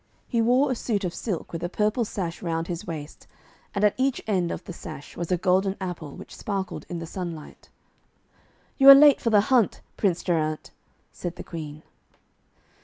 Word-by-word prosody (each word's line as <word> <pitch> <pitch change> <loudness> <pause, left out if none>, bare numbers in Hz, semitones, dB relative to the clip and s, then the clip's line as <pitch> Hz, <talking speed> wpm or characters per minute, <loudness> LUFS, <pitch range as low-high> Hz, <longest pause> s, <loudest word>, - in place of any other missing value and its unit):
He 235 -3 +1
wore 255 +4 +3
a - - 0
suit 215 -3 -2
of 175 -2 -2
silk, 190 -8 -4
with 165 - -4
a 175 - -1
purple 215 +5 0
sash 175 -5 -4
round 165 -2 -2
his 170 -1 -5
waist, 155 -3 -7 0.5
and 200 - 0
at 210 - +5
each 265 0 +1
end 185 -5 0
of 170 - -5
the 180 - -8
sash 145 - -9
was 170 +1 -4
a 180 - +3
golden 190 +2 +1
apple, 175 -6 -6
which - - -11
sparkled 195 -2 -4
in 175 - -4
the 165 - -5
sunlight. 170 -3 -7 1.1
'You 270 0 +9
are 275 - +14
late 290 0 +7
for 230 - +1
the 210 -2 +5
hunt, 235 -5 +3 0.2
Prince 180 -5 +1
Geraint,' 155 -3 -1 0.4
said 175 -1 -6
the - - -8
Queen. 155 -2 -8
185 Hz, 185 wpm, -25 LUFS, 165-215 Hz, 1.1 s, are